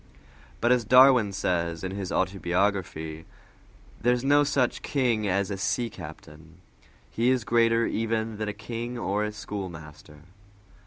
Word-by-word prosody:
But 120 - +3
as 125 -2 +3
Darwin 125 -2 +6
says 85 -3 -2
in 95 - -3
his 95 -1 -5
autobiography, 90 -4 -1 0.7
"there 120 +1 +3
is 125 - -4
no 145 +1 +4
such 140 -3 0
king 120 -7 0
as 100 +1 0
a 100 - -3
sea 120 +4 -1
captain; 80 0 -12 0.5
he 120 +2 +1
is 130 -2 +1
greater 115 0 +3
even 110 -1 -2
than 110 0 -3
a - - -1
king 115 +4 -6
or 105 -2 -1
a 105 - -2
schoolmaster!" 80 -8 -8
105 Hz, 145 wpm, -26 LUFS, 90-120 Hz, 0.7 s, Darwin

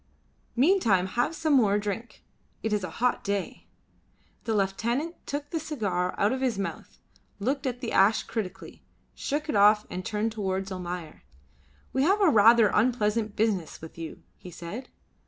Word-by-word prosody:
Meantime 245 - +3
have 240 - -1
some 315 -1 +1
more 210 -7 +4
drink. 210 +3 -5 0.4
It 220 - 0
is 210 -2 0
a 185 - -3
hot 245 +8 0
day." 200 -1 -3 0.8
The 225 -2 0
lieutenant 235 - 0
took 290 0 -4
the 325 - -1
cigar 200 - -2
out 205 +2 +3
of 260 - -3
his 250 -6 0
mouth, 195 - -5 0.4
looked 265 +7 -1
at 245 -1 -3
the 240 - -3
ash 200 +3 +4
critically, 190 -4 -6 0.3
shook 300 +2 -3
it 300 - -1
off 210 +1 +5
and 180 +1 -4
turned 215 +3 -1
towards 195 -2 -3
Almayer. 180 -3 -6 0.7
"We 265 - +1
have 385 +9 +3
a 390 -4 +5
rather 225 -2 +6
unpleasant 215 -2 +1
business 205 -7 0
with 160 - -11
you," 165 -1 -8
he 180 - -11
said. 175 +9 -8
215 Hz, 160 wpm, -27 LUFS, 195-255 Hz, 0.8 s, rather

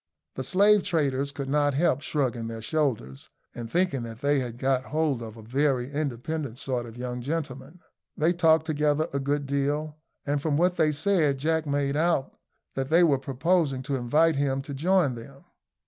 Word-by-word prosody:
The - - -4
slave 205 +2 +4
traders 140 -7 0
could 140 -1 -5
not 145 0 +1
help 145 -3 +2
shrugging 125 -7 -1
their 115 0 -6
shoulders, 115 - -2 0.2
and 115 -1 -7
thinking 175 -4 +1
that 115 0 -8
they 145 0 +2
had 120 -2 -5
got 130 0 0
hold 150 -5 0
of 115 -1 -8
a 110 - -11
very 130 +1 0
independent 140 -2 -3
sort 125 -3 -3
of 115 +1 -11
young 125 0 -4
gentleman. 145 +2 -5 0.4
They 160 +3 +2
talked 160 -2 +3
together 150 0 +1
a 140 - 0
good 140 +1 -1
deal, 145 +2 -2 0.3
and 145 0 0
from 145 -1 0
what 180 +2 +2
they 155 -2 +3
said 150 -3 +1
Jack 160 +2 0
made 140 0 0
out 160 -3 0 0.4
that 135 0 -3
they 170 +3 +5
were 145 -5 +3
proposing 135 +1 0
to 140 +2 -2
invite 150 +5 +2
him 135 -1 0
to 140 0 -7
join 165 0 +2
them. 135 +4 -11
140 Hz, 180 wpm, -26 LUFS, 130-155 Hz, 0.4 s, they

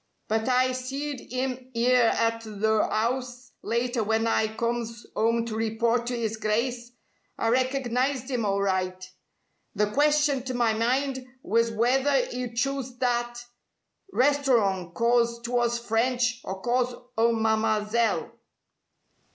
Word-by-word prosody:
But 220 +3 0
I 255 0 +3
seed 265 +2 -5
'im 255 0 -3
'ere 245 0 +4
at 230 0 0
th' 215 -2 -9
'ouse 245 +3 0
later 235 0 -1
when 220 +1 +1
I 220 -1 +2
comes 230 +1 -3
'ome 230 +1 +1
to 225 -2 -4
report 230 +2 0
to 245 -1 -2
'is 225 -1 -2
Grice. 235 +3 -1 0.5
I 225 - 0
recognized 255 +1 0
'im 245 -3 0
alright. 185 -2 -1 0.6
The 210 0 +1
question 295 0 +3
to 255 -1 -3
my 235 -2 +2
mind 260 +4 0 0.2
was 230 +3 +2
w'ether 255 +4 +2
'e'd 245 -1 -5
chose 265 -1 -2
that 240 -1 -1 0.7
restorong 245 - +2
'cause 235 +1 +2
'twas 240 0 +1
French 240 +1 0
or 190 0 -5
cause 245 0 +1 0.2
o' 230 +1 +3
Mam'selle." 220 0 +1
235 Hz, 125 wpm, -26 LUFS, 225-255 Hz, 0.7 s, ere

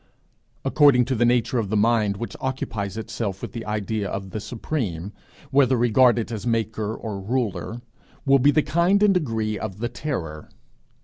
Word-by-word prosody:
According 140 -5 +5
to 130 +1 -1
the 120 +1 +2
nature 120 +1 +2
of 105 -4 -2
the 110 - +1
mind 105 -2 +2
which 115 - -6
occupies 110 -7 -3
itself 105 -3 -4
with - - -5
the 115 -2 -7
idea 105 0 -2
of 95 -1 -5
the 110 - -4
Supreme, 105 - -4 0.4
whether 135 -2 +4
regarded 120 0 +3
as 110 0 -4
maker 110 -2 -1
or 105 -4 -5
ruler, 120 +1 -2 0.4
will 135 0 +5
be 140 +3 +5
the 145 +1 +3
kind 170 +7 +2
and 205 -2 +5
degree 110 - -1
of 105 -4 -5
the 120 +2 -2
terror. 80 - -5
115 Hz, 170 wpm, -24 LUFS, 105-130 Hz, 0.4 s, According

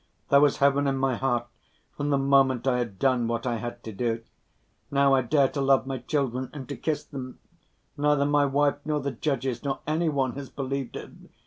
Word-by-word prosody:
There 140 0 +6
was 145 -2 +4
heaven 140 0 +3
in 135 -1 0
my 135 -1 +1
heart 120 -2 0 0.5
from 145 0 -2
the 140 - +3
moment 135 -2 +3
I 125 -2 +2
had 115 -6 -4
done 125 0 +2
what 115 +1 -2
I 120 -2 0
had 120 +1 -6
to 110 - -6
do. 115 +2 -2 0.7
Now 140 -1 +3
I 135 - +4
dare 135 +3 +3
to 140 - -3
love 135 -1 +3
my 135 -1 -4
children 130 -1 -2
and 140 -3 -7
to 140 - -4
kiss 155 -2 -2
them. 130 -3 -8 0.6
Neither 145 -1 +2
my 145 0 +3
wife 145 +1 +1
nor 150 0 -1
the 140 0 -2
judges, 130 -1 -2
nor 140 -1 -2
any 160 +2 +1
one 135 -4 0
has 140 -1 -7
believed 135 -1 -4
it. - - -7
135 Hz, 210 wpm, -26 LUFS, 125-140 Hz, 0.7 s, There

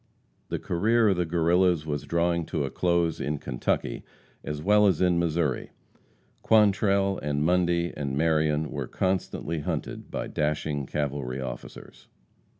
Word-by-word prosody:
The - - -1
career 110 +5 +2
of 95 - +1
the 90 -1 0
Guerrillas 85 0 +2
was 75 -2 -3
drawing 85 0 +1
to - - -1
a 65 - -5
close 85 -2 +1
in 75 0 -1
Kentucky 60 -3 -2 0.4
as 75 -1 -4
well 105 +5 +4
as 95 -6 +2
in 90 -2 +3
Missouri. 80 -5 0 0.7
Quantrell, 100 -2 +3
and 75 0 -1
Mundy, 85 0 +1
and 70 -2 -3
Marion 80 -1 +1
were 70 -4 -4
constantly 90 -3 -2
hunted 75 - -4
by - - -3
dashing 75 -2 -2
cavalry 70 -3 -3
officers. 65 -2 -8
85 Hz, 140 wpm, -27 LUFS, 75-90 Hz, 0.7 s, well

